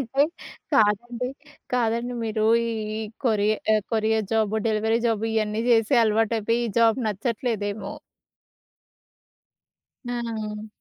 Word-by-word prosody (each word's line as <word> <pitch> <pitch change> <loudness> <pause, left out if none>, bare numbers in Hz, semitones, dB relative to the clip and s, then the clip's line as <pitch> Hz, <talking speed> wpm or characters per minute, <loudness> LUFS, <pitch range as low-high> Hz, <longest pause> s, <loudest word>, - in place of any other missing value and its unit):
అంటే 270 +3 +1 0.5
కాదండి, 235 +3 +2 0.4
కాదండి 240 0 0
మీరు 220 -1 -1 0.2
ఈ - - -1 0.5
కొరి 215 -3 +2 0.2
ఆహ్, 215 -1 +3
కొరియర్ 220 -1 +1
జాబు, 220 -1 +1
డెలివరీ 220 +1 +1
జాబు 225 -1 0
ఇయన్నీ 215 0 0
చేసే 225 -2 +4
అలవాటు 220 +1 +2
అయిపోయి, 230 +2 0
ఈ 220 - -5
జాబ్ 230 +1 +4
నచ్చట్లేదేమో! 215 -1 -2 2.2
ఆ! 220 -3 -4
220 Hz, 105 wpm, -24 LUFS, 215-230 Hz, 2.2 s, చేసే